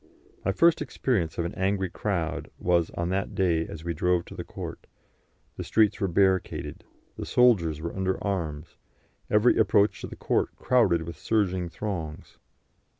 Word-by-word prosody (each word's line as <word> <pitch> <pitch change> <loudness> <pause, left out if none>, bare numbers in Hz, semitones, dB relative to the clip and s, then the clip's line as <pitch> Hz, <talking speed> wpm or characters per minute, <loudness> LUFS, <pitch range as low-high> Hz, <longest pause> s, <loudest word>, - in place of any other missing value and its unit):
My 100 - +1
first 165 - +4
experience 105 - -1
of 85 - -1
an 85 - -4
angry 95 -1 -1
crowd 85 -6 -2
was 85 -2 +2
on 85 0 -1
that 95 +2 -2
day 85 -4 +1
as 80 -1 -8
we 85 0 -2
drove 90 +2 +1
to - - -11
the - - -5
court; - - -8 0.7
the - - -4
streets 105 -2 +2
were 100 - +2
barricaded, 95 +1 0 0.3
the - - -5
soldiers 95 -12 +3
were 85 +1 -5
under 95 -1 0
arms, 85 -6 -3 0.5
every 105 +3 +4
approach 100 -2 +3
to - - -5
the - - -9
court - - 0
crowded 110 -10 +2
with 80 -1 -8
surging 95 -4 0
throngs. 85 -6 -6
95 Hz, 160 wpm, -27 LUFS, 85-100 Hz, 0.7 s, first